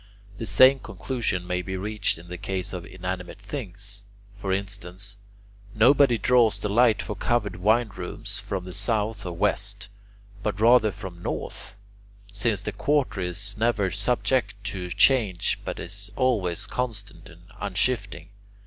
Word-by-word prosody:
The 115 - -3
same 130 +1 +7
conclusion 115 -10 -2
may 90 0 -1
be 95 +1 -4
reached 105 0 -1
in 85 +1 -13
the 90 0 -7
case 95 -1 -3
of 90 -2 -5
inanimate 90 -1 -5
things. 100 -3 -5 0.3
For 100 -1 -3
instance, 100 0 -3 0.6
nobody 125 +2 +6
draws 120 +1 +4
the 105 - -3
light 115 0 +4
for 105 - -4
covered 105 -1 0
wine 110 +5 +3
rooms 100 +2 -5
from 100 -2 -4
the 90 - -7
south 105 0 0
or 90 - -3
west, 85 - 0 0.5
but 105 -1 -2
rather 115 -1 +6
from 90 -2 -8
the - - -15
north, - - -4 0.6
since 100 0 0
that 105 -1 -5
quarter 140 -9 +1
is 95 +3 -2
never 110 -5 +2
subject 115 +1 +1 0.2
to 90 -2 -5
change 100 -2 +3
but - - -4
is 100 +4 -5
always 105 -10 +1
constant 105 -7 -4
and 85 0 -16 0.2
unshifting. 100 -2 -1
100 Hz, 150 wpm, -26 LUFS, 95-115 Hz, 0.6 s, same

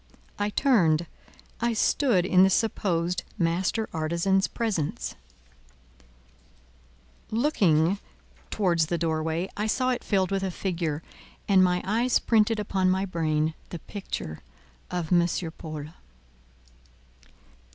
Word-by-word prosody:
I 205 0 0
turned, 175 - +3 0.5
I 235 0 +1
stood 220 -4 +2
in 185 -1 +4
the 190 - +6
supposed 180 -4 0 0.2
master 180 +5 0
artisan's 170 +4 +1
presence: 205 -11 -2 2.2
looking 195 - +2 0.5
towards 170 -6 +1
the 170 - -1
door 160 -1 0
way, 160 +3 -1
I 210 +1 -1
saw 255 +3 +1
it 245 - -2
filled 190 -2 +1
with 195 0 0
a 190 - -1
figure, 170 -4 -3 0.4
and 190 -2 +5
my 180 -1 +1
eyes 235 +5 +2
printed 220 -1 +2
upon 190 -2 +1
my 190 +1 +1
brain 155 -3 0 0.2
the 175 - -5
picture 160 - -6 0.5
of 175 -1 -2
M. 175 -1 +4 0.3
Paul. 155 -3 -7
185 Hz, 115 wpm, -26 LUFS, 165-210 Hz, 2.2 s, the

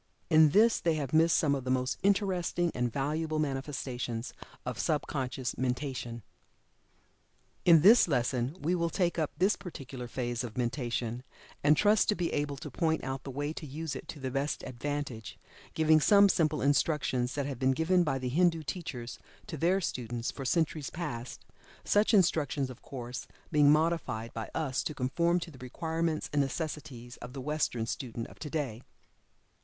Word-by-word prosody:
In 155 -1 +7
this 220 +8 +4
they 165 -2 +1
have 140 -3 -3
missed 165 +1 +5
some 145 -3 +2
of 135 -2 -2
the 130 - -4
most 130 0 0
interesting 185 -4 +1
and 125 -1 -1
valuable 155 +4 -1
manifestations 135 -4 -3 0.3
of - - -4
sub - - 0
conscious 130 -1 -3
mentation. 125 -3 -3 1.4
In 165 -3 +7
this 225 +3 +8
lesson 125 +1 0
we 165 +4 0
will 170 -2 +1
take 175 0 0
up 155 - +1
this 190 +5 +3
particular 135 -8 -8
phase 120 0 -3
of 120 -1 -7
mentation, 120 -1 -2 0.4
and 150 +1 +5
trust 210 0 +4
to 210 - +4
be 175 -3 -2
able 145 -1 -1
to - - -8
point 160 -2 0
out 135 0 -4
the - - -7
way 145 +3 -3
to 155 - -7
use 155 +2 -5
it - - -8
to 150 - -8
the 130 -1 -3
best 140 +2 -2
advantage, 130 -2 -5 0.4
giving 155 0 +5
some 200 +5 +6
simple 155 -5 +1
instructions 140 -3 +1
that 140 -2 -1
have 135 -3 -5
been 130 - +2
given 175 +5 +3
by 150 -4 0
the 130 -1 -3
Hindu 165 +3 +2
teachers 130 -8 -5 0.3
to 190 - -6
their 175 +6 +2
students 120 - -3
for 135 - -7
centuries 155 0 0
past, 135 -8 -6 0.4
such 210 +2 +3
instructions 150 - +2
of 125 - -13
course, 125 -2 -7 0.2
being 150 -2 +5
modified 150 -8 0
by 110 -1 -5
us 140 -5 0
to 150 - -3
conform 170 +7 +1
to 170 - -6
the 130 - -14
requirements 160 +5 -2
and 145 - +3
necessities 135 -4 -5
of 125 +1 -9
the 135 - -6
Western 135 -5 -1
student 115 0 -4
of - - -16
today. 145 -7 -3
145 Hz, 170 wpm, -30 LUFS, 125-165 Hz, 1.4 s, this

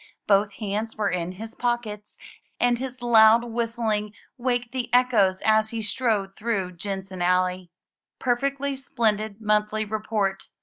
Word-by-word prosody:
Both 200 0 +3
hands 215 +2 -3
were 210 -2 0
in 180 0 -2
his 220 +4 -9
pockets, 235 -4 -3 0.4
and 245 -1 +2
his 255 -1 -6
loud 225 -1 +6
whist 230 0 -3
ling 210 -2 -1 0.2
waked 245 -2 -1
the 255 -2 -4
echoes 220 -7 +3
as 220 0 +4
he 225 -1 -4
strode 210 -3 0
through 200 -5 -2
Jensen 190 0 -6
Alley. 180 0 +1 0.5
Perfectly 275 +2 -1
splendid 220 -5 -1
monthly 210 0 +1
re 215 +1 -3
port 200 -4 -1
215 Hz, 140 wpm, -25 LUFS, 200-240 Hz, 0.5 s, loud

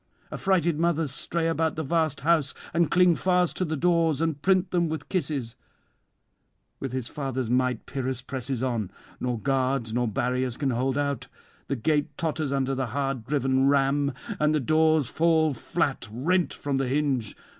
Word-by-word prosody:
Affrighted 175 -5 +1
mothers 165 -4 +1
stray 165 +4 -2
about 160 -1 0
the 160 - -2
vast 160 -1 0
house, 155 -2 +2 0.2
and 170 -1 +2
cling 180 0 +5
fast 180 0 +1
to 185 - 0
the 155 -1 -2
doors 165 -2 +2
and 160 -3 -1
print 185 0 +2
them 170 -2 +1
with 160 0 -5
kisses. 145 - -2 1.2
With 135 - -4
his 130 -2 -3
father's 130 -4 -3
might 125 -2 +1
Pyrrhus 130 -2 -3
presses 130 -1 -4
on; 115 -7 -1 0.3
nor 125 -2 -1
guards 130 -2 0
nor 120 0 +1
barriers 125 +3 -1
can 140 -2 0
hold 130 +3 0
out. 140 -1 -1 0.4
The 140 - -1
gate 145 +3 0
totters 155 -3 -1
under 135 -1 0
the 130 -1 -1
hard 135 -1 -2
driven 135 -1 +2
ram, 140 0 +2 0.3
and 150 0 +3
the - - +2
doors 155 0 +3
fall 160 -1 +3
flat, 115 - -2
rent 170 +10 +1
from 140 -2 -2
the 135 -1 0
hinge. 135 -5 0
140 Hz, 165 wpm, -26 LUFS, 130-160 Hz, 1.2 s, cling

